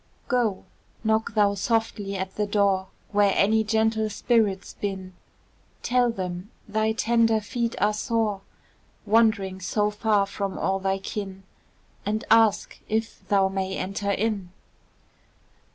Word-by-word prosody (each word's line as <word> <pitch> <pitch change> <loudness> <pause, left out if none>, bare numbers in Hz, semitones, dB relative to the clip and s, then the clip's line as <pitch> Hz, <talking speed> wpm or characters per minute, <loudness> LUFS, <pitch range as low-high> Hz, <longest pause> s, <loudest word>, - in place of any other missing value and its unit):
Go! 235 -6 0 0.4
knock 220 0 +1
thou 205 -1 +4
softly 205 -1 -1
at 190 0 -4
the 210 -1 -1
door 200 -2 +2 0.2
Where 205 -1 +4
any 220 +2 +4
gentle 220 0 +1
spirits 210 -3 +1
bin, 190 -2 -5 0.7
Tell 245 -1 +3
them 185 -3 -4 0.2
thy 220 +1 +1
tender 230 -1 +3
feet 235 +2 -3
are 210 +1 +3
sore, 215 -2 -1 0.6
Wandering 215 -3 +2
so 210 +3 0
far 210 -1 +2
from 200 -1 -4
all 195 0 0
thy 195 0 0
kin, 195 0 -6 0.6
And 215 +2 -1
ask 225 -2 +4
if 220 +1 -2
thou 195 -1 +3
may 190 0 -2
enter 195 +2 -3
in. 200 -2 -1
210 Hz, 125 wpm, -25 LUFS, 195-220 Hz, 0.7 s, thou